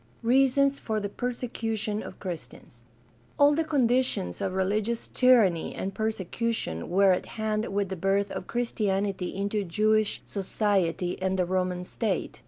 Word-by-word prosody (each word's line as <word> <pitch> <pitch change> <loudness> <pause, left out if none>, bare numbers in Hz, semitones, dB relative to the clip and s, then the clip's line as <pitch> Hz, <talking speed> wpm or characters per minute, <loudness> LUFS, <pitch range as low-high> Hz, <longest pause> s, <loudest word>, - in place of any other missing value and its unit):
Reasons 270 +3 +3
for 220 -1 -2
the 205 -1 -3
persecution 225 -3 -3
of - - -9
Christians. 155 -9 -8 0.3
— 120 +1 -33
All 290 +1 +6
the 325 +2 +1
con 290 -6 +2
ditions 245 - 0
of 185 - -1
religious 210 +5 -1
tyranny 225 -10 +3
and 195 +1 -4
persecution 220 - -2
were 195 +2 +5
at 180 - 0
hand 215 0 -1
with 200 -1 0
the 190 - -3
birth 195 +2 0
of - - -5
Christianity 200 -5 -1
into 200 +1 -1
Jewish 215 +4 +1
society 190 -3 -1
and 190 0 0
the 180 - +2
Roman 180 0 -1
state. 200 -2 -2
205 Hz, 150 wpm, -27 LUFS, 185-230 Hz, 0.3 s, All